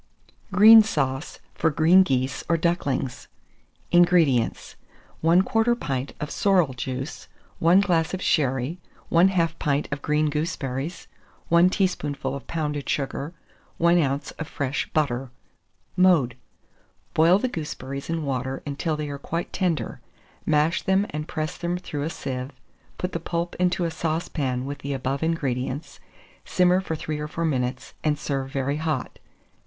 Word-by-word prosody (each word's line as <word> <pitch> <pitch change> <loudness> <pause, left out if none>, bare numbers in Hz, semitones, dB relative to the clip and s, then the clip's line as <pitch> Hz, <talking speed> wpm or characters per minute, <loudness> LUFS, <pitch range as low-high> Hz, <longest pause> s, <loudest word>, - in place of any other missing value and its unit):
GREEN 220 +4 +9
SAUCE 145 -8 -2 0.2
FOR 160 - +1
GREEN 165 +5 +5
GEESE 130 -4 -1
OR 170 - +3
DUCKLINGS. 150 -6 -1 0.6
431. 175 - +7
INGREDIENTS. 160 -10 +2 0.5
1/4 220 +8 +3
pint 135 -1 -3
of 150 - -4
sorrel 180 -9 +2
juice, 130 +3 -5 0.3
1 175 +4 +5
glass 170 -5 +1
of 185 - -3
sherry, 140 -1 0 0.3
1/2 170 -1 +3
pint 145 -1 0
of 140 0 -3
green 150 0 +1
gooseberries, 150 0 -3 0.4
1 170 +2 +6
teaspoonful 150 -9 -1
of 140 - -7
pounded 150 -3 -3
sugar, 140 +3 -2 0.4
1 170 +1 +4
oz. 140 0 -1
of 160 - -4
fresh 140 0 -2
butter. 135 -4 0 0.7
Mode. 170 -10 +4 0.8
Boil 165 +4 +5
the 255 - -1
gooseberries 140 - -6
in 165 -2 -2
water 130 0 -3
until 150 +2 -2
they 150 -1 -3
are 140 -1 -6
quite 165 +4 -4
tender; 180 -5 -1 0.5
mash 155 +2 +2
them 190 +1 +2
and 150 +1 -4
press 155 +1 -3
them 175 0 -2
through 160 -5 -5
a 150 - -1
sieve; 130 -5 -4 0.5
put 180 - -3
the 170 - -3
pulp 170 +1 -3
into 180 -1 +1
a 165 - -1
saucepan 155 -6 -2
with 145 +1 -5
the 140 0 -4
above 135 +1 -2
ingredients; 140 -3 -2 0.4
simmer 180 0 +3
for 165 -4 -3
3 155 0 -4
or 150 - -3
4 165 +2 -3
minutes, 125 -4 -2
and 150 -1 +1
serve 135 -2 -3
very 140 +1 -1
hot. 155 0 -3
155 Hz, 145 wpm, -25 LUFS, 140-170 Hz, 0.8 s, GREEN